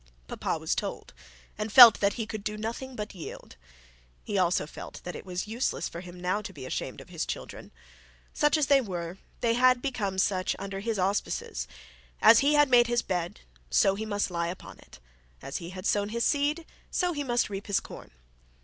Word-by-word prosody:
Papa - - -2
was - - -1
told, - - -5 0.5
and 215 0 -3
felt 235 -2 +10
that 200 0 +2
he 225 - -3
could 215 -1 -6
do 215 0 -3
nothing 235 +4 -5
but 210 -2 -5
yield. 170 - -9 0.7
He 205 - -4
also 180 -4 +2
felt 150 - -9
that 175 - -6
it - - -9
was 180 +2 -4
useless 230 +4 -2
of 170 +2 -6
him 180 0 -11
now 185 +4 -1
to - - -7
be - - -9
ashamed - - -4
of - - -15
his - - -3
children. - - -7 0.6
Such 295 +1 +3
as 305 - +2
they 275 0 +5
were, 180 -4 -5 0.2
they 230 -1 +2
had 250 +1 +4
become 220 -8 -3
such 185 -1 +1
under 195 0 -5
his 220 +1 -2
auspices; 205 - -2 0.5
as 225 +1 +8
he 290 +2 +3
had 295 0 +6
made 245 -2 +5
his 240 0 +1
bed, 175 -2 -3 0.3
so 190 - +4
he 215 +2 -5
must 205 -2 -1
lie 170 -1 -1
upon 180 +2 -8
it; - - -16 0.4
as 135 - -5
he 170 -1 -7
had 185 +1 -8
sown 205 0 +1
his 235 +2 -1
seed, 295 +3 +1 0.2
so 360 -1 0
must 265 -5 0
he - - -10
reap 195 +2 -5
his 200 - +2
corn. - - -11
210 Hz, 205 wpm, -28 LUFS, 185-245 Hz, 0.7 s, felt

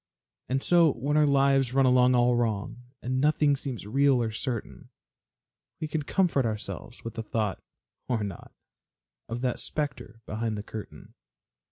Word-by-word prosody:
And 135 +1 0
so 170 -4 +5
when 140 +5 -2
our 150 -1 +5
lives 135 -2 +3
run 135 -1 +5
along 125 0 +5
all 120 0 +4
wrong, 115 0 -1 0.2
And 130 +1 -1
nothing 150 -1 +3
seems 130 -6 -6
real 135 +4 +3
or 115 -2 -1
certain, 115 0 -5 0.9
We 155 - -3
can 155 0 -2
comfort 165 -2 +1
ourselves 110 -2 -5
with 115 - -6
the 115 - -4
thought 110 -2 -2 0.5
(or 115 -4 0
not) 100 -4 -7 0.8
Of 115 +2 -4
that 125 -2 -1
specter 145 -6 -4
behind 110 0 -3
the 105 - -5
curtain. 110 0 -9
125 Hz, 155 wpm, -27 LUFS, 115-140 Hz, 0.9 s, so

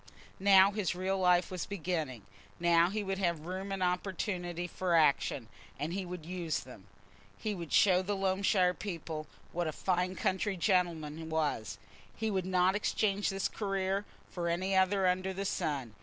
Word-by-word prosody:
Now 195 0 +7
his 200 -4 -1
real 190 +1 -1
life 180 -1 +3
was 180 -2 -4
beginning; 160 - -3 0.4
now 170 0 +4
he 210 +2 -2
would 195 0 -2
have 170 -4 0
room 190 +2 -4
and 195 -1 -1
opportunity 180 -1 -2
for 175 0 -1
action, 140 -5 +2 0.3
and 150 +4 -3
he 190 -1 -3
would 175 -3 -7
use 170 -3 -2
them. 115 -6 -13 0.5
He 215 - -2
would 170 -5 -7
show 185 -2 +5
the 200 +2 -2
Loamshire 190 -1 +2
people 165 -5 -5 0.2
what 175 -1 -1
a - - -1
fine 180 +3 0
country 190 +2 0
gentleman 165 -4 0
was; 145 -10 -1 0.4
he 220 -1 -1
would 190 -2 -1
not 185 0 +3
exchange 205 -1 +1
that 195 -1 -2
career 195 -1 -1 0.3
for 170 -1 -2
any 185 +3 0
other 190 +1 +3
under 185 +1 +1
the 195 +1 -4
sun. 140 - -2
180 Hz, 165 wpm, -32 LUFS, 170-195 Hz, 0.5 s, Now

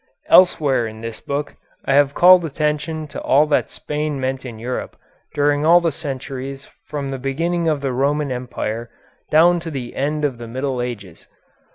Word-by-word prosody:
Elsewhere 145 -9 +5
in 110 0 -9
this 115 -1 -6
book 145 +1 -4 0.3
I 135 - +1
have 140 0 +3
called 180 0 +7
attention 155 +1 -2
to - - -7
all 145 +3 +4
that 150 - +1
Spain 150 -1 -3
meant 130 0 -3
in 115 -3 -8
Europe 125 +3 -5 0.4
during 145 0 +2
all 170 +3 +6
the 170 -2 0
centuries 135 -2 -6 0.2
from 145 -2 -4
the 135 -1 -4
beginning 165 +6 -1
of 150 -3 +1
the 135 -2 -1
Roman 140 +2 0
Empire 120 -2 -4 0.4
down 170 +3 +5
to 165 0 -6
the 130 -5 -6
end 150 +2 -1
of 130 -5 -2
the 120 - -7
Middle 130 +1 -3
Ages. 100 -8 -7
140 Hz, 175 wpm, -20 LUFS, 130-150 Hz, 0.4 s, called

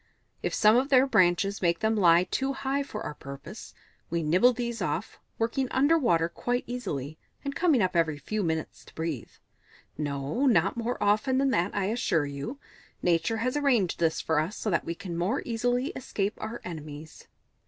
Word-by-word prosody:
If - - -1
some 215 +1 +5
of 265 +3 +1
their 265 -1 +6
branches 195 -4 +2
make 170 -2 +2
them 220 0 +2
lie 175 -4 +5
too 270 +9 -1
high 270 +1 -1
for 220 -6 -6
our - - -4
purpose, 140 -1 -10 0.3
we 170 0 -1
nibble 180 +11 +5
these 235 -2 -4
off, 170 +4 -3 0.2
working 230 +4 0
under 285 +5 +3
water 170 - +2
quite 245 +8 -2
easily, 155 - -5 0.3
and 280 - -2
coming 315 - +3
up 185 -1 0
every 160 -3 +2
few 210 +9 -3
minutes 160 -3 -3
to - - -17
breathe. 160 -7 -3 0.7
(No 145 - -1
not 240 - +3
more 235 +1 -2
often 215 +6 +2
than 270 0 +2
that, 175 0 0
I 200 -1 0
assure 200 - +1
you. 140 - -5 0.5
Nature 170 +5 +2
has 255 - 0
arranged 250 -11 +2
this 165 -1 +1
for 160 -2 +1
us, 160 +7 -2
so 215 - -2
that 170 - +1
we 170 - -3
can 180 -2 -6
more 185 +11 0
easily 245 +3 0
escape 205 -4 -3
our 220 +2 -5
enemies.) 155 -2 -9
205 Hz, 185 wpm, -28 LUFS, 165-245 Hz, 0.7 s, their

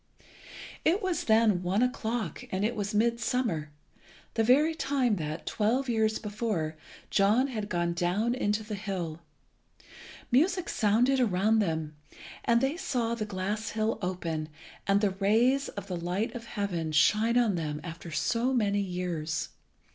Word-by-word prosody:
It 370 +7 +2
was 365 -4 -1
then 220 -4 +4
one 190 +6 +1
o'clock, 230 - -2
and 190 +2 0
it 235 +2 -1
was 205 -1 -2
midsummer, 235 -7 0 0.6
the 225 - +2
very 290 +8 +4
time 270 -8 +1
that, 155 0 -4
twelve 240 +6 0
years 220 -2 +1
before, 205 -7 -2 0.4
John 215 +7 +3
had 215 -5 -4
gone 175 -2 0
down 185 +7 0
into 215 -4 0
the 215 0 -6
hill. 185 -6 -4 1.1
Music 345 +8 +2
sounded 240 +5 +3
around 215 -1 +3
them, 160 -6 -1 0.5
and 235 0 +3
they 270 +5 0
saw 245 -10 -1
the 225 -2 -2
glass 205 +3 -3
hill 220 0 -1
open, 165 -4 -3 0.4
and 200 +1 +3
the 205 -2 +2
rays 225 +8 +2
of 200 - -7
the 185 -3 -4
light 180 +6 -2
of 235 -1 -7
heaven 185 -8 -2
shine 215 +10 +4
on 235 -4 +3
them 150 -4 -3
after 170 0 -8
so 230 +10 0
many 205 -3 +2
years. 175 - -3
210 Hz, 145 wpm, -29 LUFS, 180-235 Hz, 1.1 s, then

